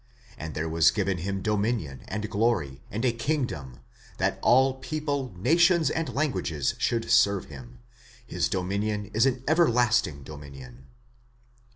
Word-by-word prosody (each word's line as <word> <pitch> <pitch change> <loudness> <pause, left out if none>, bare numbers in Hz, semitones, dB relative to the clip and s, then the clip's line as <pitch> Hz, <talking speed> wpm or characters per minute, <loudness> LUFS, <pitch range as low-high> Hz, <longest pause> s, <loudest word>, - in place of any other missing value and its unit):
And 80 -1 -7
there 80 +1 -2
was 80 0 +4
given 95 -3 -1
him 95 +2 -3
dominion, 105 - -1
and 105 +2 -3
glory, 105 - 0
and 110 +5 -3
a 125 - +4
kingdom, 115 - -3 0.4
that - - 0
all 130 +1 +4
people, 145 -3 -3
nations 165 - +3
and 160 -1 -2
languages 90 - -1
should 115 -1 0
serve 100 -4 +4
him: 65 -4 -11 0.5
his - - -1
dominion 100 +2 -2
ts 110 +5 +3
an 130 -1 -1
everlasting 120 - +2
dominion. 70 -3 -11
105 Hz, 135 wpm, -27 LUFS, 80-130 Hz, 0.5 s, was